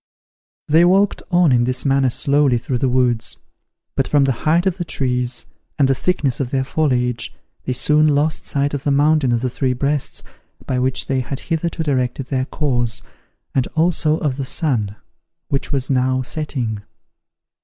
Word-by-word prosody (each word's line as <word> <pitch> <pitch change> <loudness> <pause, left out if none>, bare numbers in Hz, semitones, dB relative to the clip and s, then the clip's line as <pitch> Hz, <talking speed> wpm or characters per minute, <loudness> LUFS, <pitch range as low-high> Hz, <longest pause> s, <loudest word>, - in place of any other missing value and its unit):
They 160 +3 +5
walked 190 +3 +3
on 175 -4 +4
in 120 -1 +3
this 125 +1 -2
manner 135 -1 +3
slowly 140 0 +2
through 120 +1 -2
the 130 - +1
woods; 125 -3 +1 0.6
but - - +1
from 145 -2 +3
the 135 - +2 0.2
height 170 +3 +3
of 190 -1 0
the 175 - -2
trees, 125 -5 -1 0.3
and 140 -3 +4
the 135 - +3
thickness 140 -4 -1
of 135 -3 -2
their 135 0 0
foliage, 125 -5 -1 0.3
they 130 - -1
soon 150 +4 +3
lost 150 +1 +1
sight 140 0 -1
of 140 -1 -3
the - - 0
mountain 145 -1 +3
of 120 -1 +1
the 130 - -1
Three 130 0 0
Breasts, 140 +2 -2 0.4
by 125 - -1
which 130 +1 0
they 135 -1 0
had 130 +2 -4
hitherto 165 0 -2
directed 130 -3 -1
their 130 -2 0
course, 120 -6 -1 0.5
and 130 -2 +1
also 160 -1 +2
of 140 -5 -2
the 140 - -2
sun, 125 - -1 0.5
which 140 -2 -2
was 135 -1 -1
now 130 0 +1
setting. 125 -7 -4
135 Hz, 175 wpm, -19 LUFS, 125-150 Hz, 0.6 s, They